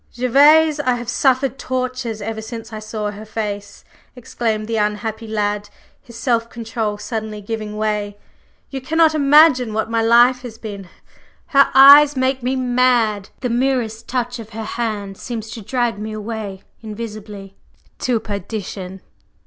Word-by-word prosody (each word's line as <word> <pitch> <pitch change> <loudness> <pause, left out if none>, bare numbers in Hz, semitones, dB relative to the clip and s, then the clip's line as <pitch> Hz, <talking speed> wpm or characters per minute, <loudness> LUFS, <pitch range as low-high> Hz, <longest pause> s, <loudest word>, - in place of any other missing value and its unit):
"Gervase, 295 +5 +5
I 255 -4 +1
have 240 -1 -6
suffered 265 0 +1
tortures 255 -4 -3
ever 220 +1 -4
since 225 0 -8
I 215 - -5
saw 215 -1 -4
her 210 +1 -10
face!" 210 -2 -6 0.3
exclaimed 225 -3 -3
the 225 0 -1
unhappy 215 +1 -2
lad, 210 -1 -2 0.3
his 235 -2 -13
self 230 -2 0
control 225 -3 -4
suddenly 215 -1 -5
giving 210 0 -5
way. 210 -1 -2 0.5
"You 270 -1 -5
cannot 320 +4 +3
imagine 285 -5 +5
what 220 +1 -2
my 230 0 +1
life 240 +3 +5
has 240 -3 -9
been! 200 -5 -8 0.6
Her 275 -3 +5
eyes 285 +2 +9
make 260 0 0
me 255 +2 -1
mad, 245 -5 +1
the 250 - -1
merest 240 -3 -1
touch 245 -1 -2
of 220 -2 -9
her 225 0 -5
hand 215 -3 -4
seems 225 -3 -6
to 230 - -7
drag 240 -1 -1
me 215 +1 -5
away 215 -3 -6 0.2
invisibly. 210 -3 -8 0.2
…" - - -36
"To 245 -3 +2
perdition!" 200 -2 -6
225 Hz, 150 wpm, -19 LUFS, 210-255 Hz, 0.6 s, eyes